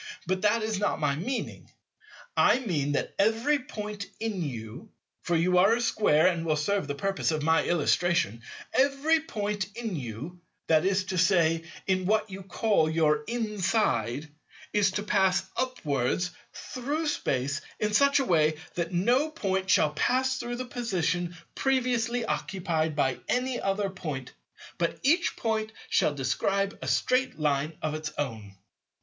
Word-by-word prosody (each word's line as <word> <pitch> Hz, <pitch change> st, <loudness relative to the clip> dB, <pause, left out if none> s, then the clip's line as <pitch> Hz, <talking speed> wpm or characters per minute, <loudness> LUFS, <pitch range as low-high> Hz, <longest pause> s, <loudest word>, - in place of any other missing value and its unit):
But 185 Hz, +1 st, -1 dB
that 215 Hz, +2 st, +2 dB
is 215 Hz, -2 st, -1 dB
not 205 Hz, -, 0 dB
my 145 Hz, -2 st, +1 dB
meaning. 245 Hz, -, -4 dB, 0.7 s
I -, -, +5 dB
mean 155 Hz, -, -1 dB
that -, -, -2 dB
every 225 Hz, +8 st, +3 dB
Point 210 Hz, -5 st, -6 dB
in 220 Hz, -4 st, -2 dB
you—for 125 Hz, +5 st, -6 dB
you 180 Hz, +2 st, +3 dB
are 200 Hz, +5 st, +5 dB
a -, -, -2 dB
Square 210 Hz, -9 st, +3 dB
and 170 Hz, -3 st, +2 dB
will 160 Hz, -2 st, +1 dB
serve 155 Hz, +3 st, 0 dB
the 145 Hz, -, -3 dB
purpose 195 Hz, +5 st, -1 dB
of 155 Hz, -2 st, -1 dB
my 160 Hz, +1 st, +3 dB
illustration—every 175 Hz, -, +1 dB
Point 210 Hz, -, -3 dB
in 225 Hz, -5 st, -3 dB
you, 140 Hz, +7 st, -6 dB, 0.2 s
that 160 Hz, +1 st, +3 dB
is 195 Hz, 0 st, +2 dB
to 185 Hz, -1 st, -2 dB
say 165 Hz, -3 st, +3 dB, 0.2 s
in 185 Hz, -1 st, 0 dB
what 215 Hz, 0 st, +1 dB
you 190 Hz, +1 st, -7 dB
call 190 Hz, -3 st, +1 dB
your 155 Hz, -2 st, +2 dB
inside, 195 Hz, -, 0 dB, 0.5 s
is 205 Hz, -2 st, +4 dB
to 205 Hz, -, -2 dB
pass 195 Hz, -3 st, +2 dB
upwards 175 Hz, -, -1 dB, 0.2 s
through 290 Hz, +6 st, -4 dB
Space 140 Hz, -, -1 dB, 0.2 s
in 210 Hz, 0 st, 0 dB
such 280 Hz, +5 st, +5 dB
a 270 Hz, -, 0 dB
way 155 Hz, -6 st, +3 dB, 0.2 s
that 170 Hz, 0 st, -2 dB
no 240 Hz, -, +2 dB
Point 190 Hz, -11 st, -2 dB
shall 155 Hz, -4 st, +4 dB
pass 260 Hz, +9 st, +1 dB
through 240 Hz, 0 st, -4 dB
the 255 Hz, +1 st, -4 dB
position 175 Hz, -8 st, -2 dB, 0.2 s
previously 245 Hz, -3 st, 0 dB
occupied 165 Hz, -7 st, -1 dB
by 135 Hz, -3 st, +1 dB
any 250 Hz, 0 st, 0 dB
other 195 Hz, 0 st, 0 dB
Point; 150 Hz, -8 st, -6 dB, 0.5 s
but 170 Hz, -1 st, -1 dB
each 330 Hz, +6 st, +3 dB
Point 220 Hz, -1 st, -1 dB, 0.2 s
shall 145 Hz, -, +2 dB
describe 195 Hz, +9 st, 0 dB
a -, -, -5 dB
straight 255 Hz, +1 st, +1 dB
Line 150 Hz, 0 st, 0 dB
of 155 Hz, -1 st, -1 dB
its 155 Hz, 0 st, -4 dB
own. 110 Hz, -8 st, -4 dB
190 Hz, 150 wpm, -28 LUFS, 155-225 Hz, 0.7 s, I